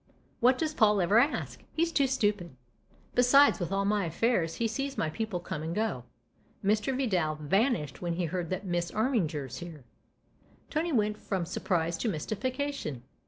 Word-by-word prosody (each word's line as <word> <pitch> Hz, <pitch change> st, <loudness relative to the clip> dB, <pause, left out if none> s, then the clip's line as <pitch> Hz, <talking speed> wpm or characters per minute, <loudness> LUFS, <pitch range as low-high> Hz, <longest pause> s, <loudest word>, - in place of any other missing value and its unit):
" -, -, -36 dB
What 250 Hz, +2 st, +4 dB
does 310 Hz, 0 st, -1 dB
Paul 210 Hz, -6 st, +4 dB
ever 195 Hz, +5 st, +4 dB
ask? 280 Hz, +5 st, 0 dB
He's 335 Hz, +1 st, +1 dB
too 280 Hz, -4 st, +3 dB
stupid! 205 Hz, -, 0 dB, 0.6 s
Besides, 265 Hz, +3 st, +5 dB
with 175 Hz, -1 st, -3 dB
all 195 Hz, 0 st, +1 dB
my 205 Hz, -1 st, +1 dB
affairs, 170 Hz, -1 st, 0 dB
he 230 Hz, -, 0 dB
sees 275 Hz, +5 st, -3 dB
my 155 Hz, -, 0 dB
people 215 Hz, 0 st, -3 dB
come 170 Hz, -3 st, -5 dB
and 165 Hz, +2 st, -4 dB
go. 210 Hz, -, -1 dB, 0.6 s
Mr. 215 Hz, +5 st, +1 dB
Vidal 180 Hz, -, +1 dB
vanished 155 Hz, -, 0 dB
when 175 Hz, -1 st, -1 dB
he 175 Hz, +1 st, -1 dB
heard 170 Hz, 0 st, -3 dB
that 185 Hz, +2 st, -3 dB
Miss 175 Hz, -1 st, -1 dB
Armiger's 165 Hz, -, -1 dB
here." 165 Hz, -5 st, -9 dB, 0.9 s
Tony 325 Hz, +2 st, 0 dB
went 210 Hz, -4 st, +1 dB
from 190 Hz, -4 st, -2 dB
surprise 170 Hz, -1 st, -1 dB
to 230 Hz, -, 0 dB
mystification. 220 Hz, -, -3 dB
200 Hz, 165 wpm, -29 LUFS, 170-245 Hz, 0.9 s, Besides